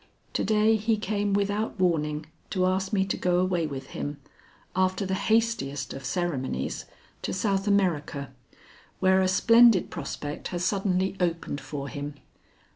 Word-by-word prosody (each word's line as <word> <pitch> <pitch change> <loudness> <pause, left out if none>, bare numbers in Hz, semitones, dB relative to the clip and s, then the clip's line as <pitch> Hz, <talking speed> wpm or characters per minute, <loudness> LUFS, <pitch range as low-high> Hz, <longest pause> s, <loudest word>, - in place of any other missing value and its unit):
To - - 0
day 220 +1 +3
he 220 +1 +1
came 205 -1 -1
without 205 +2 0
warning 155 -4 +1 0.2
to 185 -2 +1
ask 190 +1 0
me 195 -3 +2
to 195 - -1
go 180 -1 +1
away 180 -3 +1
with 135 -2 -7
him, 145 0 -4 0.6
after 185 +1 +1
the 190 - -2
hastiest 190 - 0
of 135 -1 -8
ceremonies, 135 - -2 0.4
to - - -3
South 195 0 0
America, 160 - +1 0.7
where 190 0 +4
a 185 - +3
splendid 230 +1 +5
prospect 145 0 -5
has 175 -1 -2
suddenly 190 -1 +1
opened 170 -5 -1
for 140 -2 -5
him. 145 +2 -5
185 Hz, 145 wpm, -27 LUFS, 150-200 Hz, 0.7 s, splendid